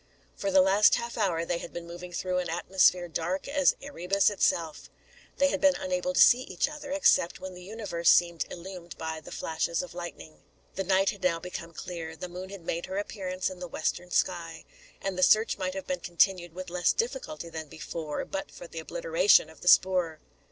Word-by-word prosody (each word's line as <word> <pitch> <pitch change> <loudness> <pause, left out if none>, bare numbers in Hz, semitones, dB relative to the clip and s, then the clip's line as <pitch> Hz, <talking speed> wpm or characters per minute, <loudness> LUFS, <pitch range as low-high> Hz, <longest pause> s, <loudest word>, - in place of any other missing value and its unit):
For 200 - -2
the 190 -1 +6
last 195 +2 +5
half 235 0 -4
hour, 175 -6 0
they 170 0 -1
had - - -8
been 170 0 -6
moving 175 +1 -9
through 180 +1 -1
an 180 - -3
atmosphere 180 +1 +3
dark 170 +3 -3
as 285 -1 +3
Erebus 200 -7 +1
itself. 165 -5 0 0.5
They 280 - +4
had - - -2
been 285 -1 +5
unable 275 -1 -2
to - - +3
see 250 +1 +7
each 185 -5 -1
other, 300 -1 -8
except 280 -11 +3
when 190 0 -7
the 180 - -11
universe 190 -4 -1
seemed 170 -1 +4
illumed 175 -1 -9
by 160 0 -4
the - - -12
flashes 165 +1 -2
of 180 - -10
lightning. 170 -2 -8 0.3
The 195 - -2
night 195 +1 +3
had 200 - -12
now 170 -2 +1
become 170 -1 -7
clear. 165 -1 -6
The 180 - -6
moon 180 +2 -7
had 195 -4 -10
made 170 +1 -3
her 190 - -4
appearance 185 -3 -3
in 185 - -10
the 180 - -5
western 175 +2 -3
sky; 170 -3 -1 0.4
and 195 -2 -2
the - - +1
search 215 +3 +4
might 185 0 -2
have 190 - -5
been 275 -1 -2
continued 175 -1 +1
with 185 -1 -7
less 180 0 +2
difficulty 465 - -3
than 160 -1 -6
before, 155 0 -5
but 290 0 -5
for - - -11
the - - -7
obliteration - - +3
of - - -18
the - - -8
spoor. 180 -4 +4
185 Hz, 205 wpm, -28 LUFS, 170-205 Hz, 0.5 s, see